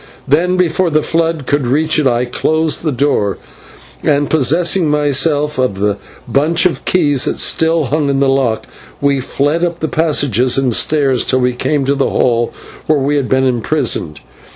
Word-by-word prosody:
Then, 180 +6 +2
before 180 0 +1
the 155 -1 +1
flood 165 -3 -1
could 140 -1 0
reach 155 +5 +1
it, 145 - +2
I 120 0 +1
closed 155 +5 -1
the 160 - -1
door, 125 -7 0 0.6
and, 145 -1 0
possessing 165 +3 +2
myself 150 0 0
of 125 -6 0
the 105 +1 0 0.3
bunch 150 +9 +1
of 180 - -1
keys 145 -7 +1
that - - -2
still 160 0 +1
hung 145 +2 -1
in 135 -1 0
the 140 - +2
lock, 135 -5 0 0.3
we 140 -1 +1
fled 145 +5 -1
up 170 -1 -1
the 160 - -3
passages 135 - +1
and 130 -3 +1
stairs 135 -2 +1
till 130 - 0
we 125 0 +1
came 140 +3 -1
to 140 - +1
the 140 -1 0
hall 120 -1 0 0.4
where 155 - +3
we 140 +1 0
had 140 -3 -1
been 130 0 +2
imprisoned. 115 - -1
145 Hz, 175 wpm, -14 LUFS, 130-160 Hz, 0.6 s, where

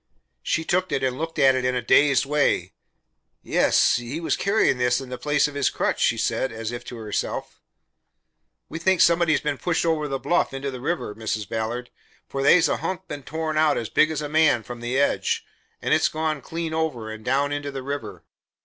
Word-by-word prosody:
She 160 - -1
took 185 +2 0
it 135 - -1
and 130 0 -1
looked 165 +1 -4
at 135 -1 +5
it 130 -1 -1
in 125 0 +1
a 125 - 0
dazed 140 +2 +4
way. 150 +1 +1 0.7
"Yes. - - +3
He 120 +6 -5
was 170 - 0
carrying 200 - +2
this 125 0 +2
in 135 -2 -8
the 125 - -5
place 150 -1 +2
of 145 - -8
his 140 -2 +1
crutch," - - -1
she 115 - +2
said, 115 +3 -1
as 115 0 -5
if 120 - -6
to 120 - -8
herself. 110 -2 -4 1.1
"We 165 - -6
think 190 +1 +2
somebody's 170 -2 +4
been 150 -2 -2
pushed 175 -1 0
over 160 -2 +1
the 135 -1 -2
bluff 155 -1 0
into 135 +1 -3
the 130 -2 -8
river, 160 -7 -2
Mrs. 110 -1 -3
Ballard, 115 +2 -4 0.4
for 135 - -4
they's 165 +5 +5
a - - 0
hunk 185 -3 -4
been 145 -1 -6
tore 160 +3 -4
out 155 -1 +3
as 115 - -3
big 155 - +3
as 155 -2 -3
a - - -3
man, 150 -6 +3
from 120 0 -8
the 120 +2 -2
edge, 140 - +1 0.4
and - - +2
it's - - +3
gone 155 -2 -2
clean 165 +3 -4
over, 140 -9 -2
and 110 0 -9
down 140 +4 +1
into 145 0 -3
the 135 -2 -6
river. 140 +2 -5
140 Hz, 210 wpm, -24 LUFS, 125-160 Hz, 1.1 s, at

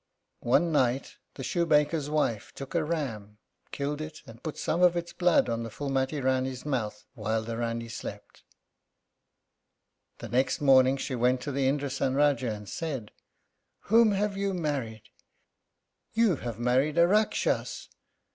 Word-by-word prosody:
One 165 +8 +3
night 130 -3 +1 0.2
the 135 - -6
shoemaker's 150 -1 +1
wife 145 -8 0
took 135 -1 -8
a 170 -2 +1
ram, 115 -10 -4 0.3
killed 145 +1 -3
it, 155 0 -8
and 115 +1 -13
put 155 - -5
some 170 - -1
of 175 -1 +5
its 170 0 -4
blood 180 -1 +3
on 115 0 -1
the 115 - -5
Phúlmati 135 +3 -2
Rání's 130 0 -1
mouth 110 -7 -3
while 110 -2 -1
the 115 +1 -5
Rání 115 0 -3
slept. - - -8 1.8
The - - -7
next 130 +2 +1
morning 135 -1 +5
she 135 - -4
went 125 +1 +2
to 145 - -4
the 135 -1 +1
Indrásan 135 -1 0
Rájá 140 -5 +2
and 105 -1 -7
said, 135 - -4 0.8
"Whom 225 -2 +6
have 200 0 0
you 195 -1 -1
married? 135 -10 -3 1.1
You 225 -8 +3
have 120 -3 -5
married 130 +6 +1
a 170 0 +6
Rakshas. 215 +3 0
135 Hz, 145 wpm, -28 LUFS, 120-155 Hz, 1.8 s, Whom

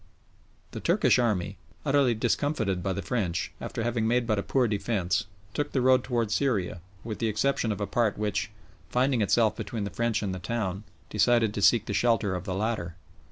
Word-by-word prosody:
The - - -6
Turkish - - +3
army, 100 -5 0 0.3
utterly 135 -4 +3
discomfited 110 -5 0
by 95 - -1
the 95 0 -3
French, 90 -5 -1
after 115 - -4
having 115 -1 0
made 120 +1 +2
but 110 -3 +1
a - - +1
poor 125 +3 +1
defence, 100 -3 0 0.3
took 145 +2 -2
the 130 - +2
road 130 0 +4
towards 115 -4 -1
Syria, 100 -11 0 0.2
with 110 -2 -5
the 115 - 0
exception 110 +2 0
of 100 - -3
a 100 - -1
part 110 -1 0
which, 105 -1 -1 0.4
finding 125 -1 +2
itself 110 +1 +3
between 115 -5 -4
the 100 - -4
French 115 -2 0
and 95 -2 -2
the 95 - -5
town, 100 0 -3 0.3
decided 115 0 +3
to 100 - -3
seek 110 +2 +5
the - - -3
shelter 115 -5 +2
of 90 0 -4
the 95 -2 -3
latter. 95 -5 -2
110 Hz, 195 wpm, -27 LUFS, 100-120 Hz, 0.4 s, seek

